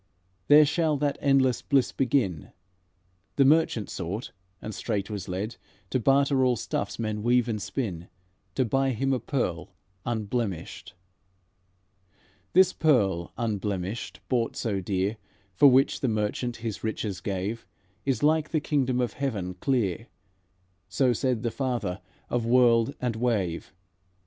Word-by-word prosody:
There 150 +1 +8
shall 155 0 +1
that 145 0 -1
endless 135 -4 +3
bliss 135 -3 +2
begin, 120 - 0 0.8
The 135 - +4
merchant 145 -8 +3
sought, 95 +7 -4 0.3
and 110 - -6
straight 105 -1 -3
was 100 -2 -5
led 105 +6 -4 0.3
To 130 - +1
barter 135 +2 +3
all 125 -1 +3
stuffs 110 - -3
men 110 -2 -3
weave 120 +1 +3
and 110 -3 -2
spin, 95 -9 -4 0.5
To 130 - +2
buy 135 +3 +1
him 135 +4 0
a 130 - 0
pearl 105 - -3 0.3
unblemished." 110 -7 -3 1.6
"'This 185 0 +5
pearl 100 - +2
unblemished, 105 -2 -3
bought 120 -3 0
so 105 -4 -1
dear, 95 +3 -1 0.4
For 145 - +6
which 135 +1 +4
the 135 - 0
merchant 110 +2 -1
his 115 -2 -5
riches 110 -3 -3
gave, 100 +2 -3 0.4
Is 135 -2 -1
like 155 +1 +3
the 160 - +1
kingdom 135 -4 0
of 120 -4 -1
heaven 105 -10 -3
clear;' 115 -2 -1 0.8
So 130 -3 +2
said 125 -1 -1
the 115 - -1
Father 120 -8 -2 0.3
of 120 -1 -1
world 120 +1 +4
and 125 -3 -1
wave. 105 -8 -1
120 Hz, 135 wpm, -27 LUFS, 105-135 Hz, 1.6 s, There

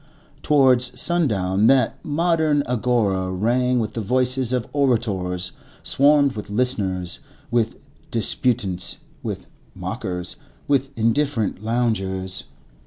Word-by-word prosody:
Towards 125 -4 +3
sundown, 105 - +2
that 130 -3 +2
modern 155 -1 +1
Agora 110 -6 0
rang 125 +6 +1
with 110 -2 -1
the 115 - -3
voices 125 +3 +1
of 125 -2 -1
orators, 100 -10 0 0.3
swarmed 140 0 +4
with 105 -3 -7
listeners, 100 -6 -1 0.3
with 115 -2 +1 0.3
disputants, 105 -5 0 0.2
with - - -5 0.3
mockers, 90 +6 -4 0.3
with 135 -1 +2
indifferent 115 -3 0
loungers. 95 -5 -1
120 Hz, 100 wpm, -22 LUFS, 95-130 Hz, 0.3 s, swarmed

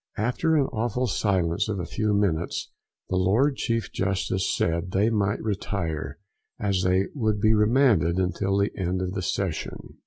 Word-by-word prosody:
After 125 +9 +1
an 145 -3 +3
awful 120 +2 -1
silence 95 -4 0
of 100 -3 -2
a 85 - -3
few 105 +3 -1
minutes, 95 -5 0 0.4
the 95 - 0
Lord 110 +10 +3
Chief 115 -3 -2
Justice 95 -1 -1
said 85 +1 0
they 105 +4 +3
might 100 -2 0
retire, 85 -8 -3 0.4
as 100 -4 0
they 95 +1 +2
would 110 -6 0
be 110 +2 +4
remanded 105 - +3
until 95 +1 0
the 100 +1 0
end 95 -1 -1
of 90 - -2
the 95 0 -3
session. 90 -2 -4
100 Hz, 160 wpm, -25 LUFS, 90-110 Hz, 0.4 s, be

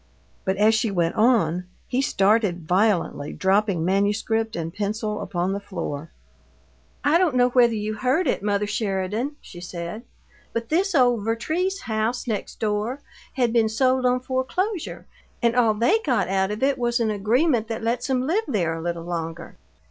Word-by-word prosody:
But, 190 0 0
as 215 +2 +5
she 225 0 +1
went 170 -4 0
on, 210 -7 +2 0.2
he 255 - 0
started 200 - +1
violently, 180 -6 +1
dropping 195 -3 +1
manuscript 210 +4 0
and 165 -1 -4
pencil 210 +1 -2
upon 180 +1 -1
the 200 - -2
floor. 165 -6 -5 0.9
"I 300 +5 +4
don't 345 -8 +2
know 250 0 +4
whether 240 -2 +4
you 215 0 -2
heard 255 +11 +1
it, - - 0
mother 205 0 0
Sheridan," 205 +5 -2
she 175 - -11
said, 175 +4 -6 0.5
"but 230 0 -3
this 365 +3 +1
old 245 -5 +3
Vertrees 320 - -1
house, 220 +2 -1
next 215 -4 -4
door, 215 +5 -1 0.3
had 245 -3 +1
been 225 -2 +3
sold 255 +3 +2
on 250 0 +1
foreclosure, 305 - -2 0.3
and 235 -1 +2
all 230 -3 +3
THEY 240 - +3
got 240 -8 +1
out 190 0 +1
of 210 +4 -3
it 275 -1 +2
was 240 0 +1
an 225 -2 +1
agreement 225 +4 +1
that 225 0 -4
let's 240 +3 -1
'em 255 -1 +1
live 385 +10 +1
there 180 - 0
a 165 - -5
little 170 0 -3
longer. 165 -1 -5
220 Hz, 170 wpm, -24 LUFS, 195-250 Hz, 0.9 s, as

